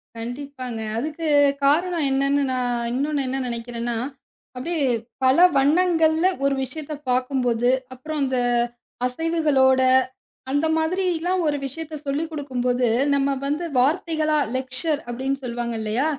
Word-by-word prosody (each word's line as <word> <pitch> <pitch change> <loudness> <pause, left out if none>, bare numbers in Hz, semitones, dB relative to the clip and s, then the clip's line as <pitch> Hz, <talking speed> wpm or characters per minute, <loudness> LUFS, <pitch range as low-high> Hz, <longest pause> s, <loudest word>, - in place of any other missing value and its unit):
கண்டிப்பாங்க. 245 0 -6 0.2
அதுக்கு 310 +6 -3 0.4
காரணம் 330 +2 +2
என்னன்னு 275 +1 +2
நான் 245 -2 0
இன்னொன்னு 285 +2 0
என்ன 265 +1 -2
நெனைக்கிறேன்னா, 235 0 -2 0.6
அப்டி 330 +7 -3 0.5
பல 260 +1 +4 0.2
வண்ணங்கள்ல 325 +3 +3 0.2
ஒரு 275 0 +3
விஷயத்தப் 295 +2 -7
பார்க்கும் 255 +1 0
போது, 240 0 +2 0.2
அப்புறம் 300 +4 -5
அந்த 260 -1 0 0.7
அசைவுகளோட 275 -2 +2 0.7
அந்த 290 +3 +1
மாதிரிலாம் 360 +2 0
ஒரு 290 -1 +1
விஷயத்த 310 +3 -6
சொல்லிக்குடுக்கும்போது 275 -5 -1 0.3
நம்ம 280 0 +2 0.2
வந்து 300 +5 -1
வார்த்தைகளா 310 +3 +1 0.2
லெக்சர் 260 +4 -2
அப்டின்னு 265 +3 -2
சொல்லுவாங்க. 240 -1 -3
இல்லையா? 220 +6 0
275 Hz, 110 wpm, -23 LUFS, 250-315 Hz, 0.7 s, பல